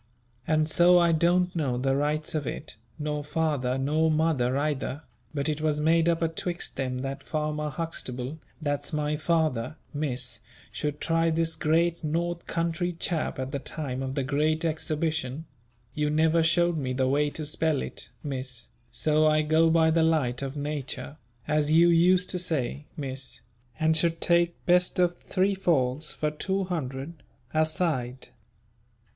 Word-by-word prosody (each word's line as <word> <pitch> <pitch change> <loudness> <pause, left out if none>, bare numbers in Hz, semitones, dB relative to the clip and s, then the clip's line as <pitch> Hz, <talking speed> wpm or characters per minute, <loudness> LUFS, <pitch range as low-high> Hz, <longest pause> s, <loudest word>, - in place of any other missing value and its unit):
And 155 -1 +2
so 175 +2 +6
I 170 -1 +4
don't 175 +2 +2
know 135 -7 0
the 135 +2 +1
rights 150 +2 0
of 150 -5 -2
it, - - -6 0.2
nor 150 -1 -2
father 145 -4 0
nor 155 +4 +2
mother 150 -5 +2
either, 145 0 -2 0.3
but 140 -2 -2
it 155 0 -1
was 155 -1 +1
made 165 +2 +3
up 170 0 +1
atwixt 170 +2 -3
them 130 -1 -2
that 135 0 -4
Farmer 150 -1 -2
Huxtable, 140 -3 -4 0.2
that's 145 -2 -2
my 150 0 0
father, 155 -5 0 0.2
Miss, 130 -4 -3 0.3
should 150 0 -3
try 165 0 +2
this 165 0 0
great 170 +2 +1
North 170 +2 -2
country 170 +1 -1
chap 165 -2 -1
at 130 0 -4
the 140 - -2
time 135 -3 -4
of 135 0 -3
the 140 - 0
great 150 +4 +1
Xabition 155 -3 -1 0.5
you 150 +1 0
never 160 +2 +3
showed 170 +1 +2
me 130 -2 -2
the 130 0 +1
way 145 +2 +2
to 155 +1 -6
spell 155 -1 0
it, - - -6
Miss, 130 -4 -5 0.2
so 155 +6 +2
I 155 0 +3
go 160 +2 +4
by 160 0 +4
the 165 +1 +3
light 150 -7 +1
of 135 +1 -4
nature, 145 0 -4 0.3
as 150 0 +1
you 170 +2 +6
used 180 +2 +4
to 180 - -2
say, 150 -4 -2
Miss 135 -2 -5 0.4
and 160 0 +3
should 165 +1 +1
take 170 0 +2
best 180 0 +3
of 175 -1 +2
three 195 +1 +1
falls 155 -6 +1
for 150 0 -2
200*l.* 165 -5 -3 0.4
a 155 0 +4
side. 130 -7 -2
155 Hz, 160 wpm, -27 LUFS, 140-165 Hz, 0.5 s, so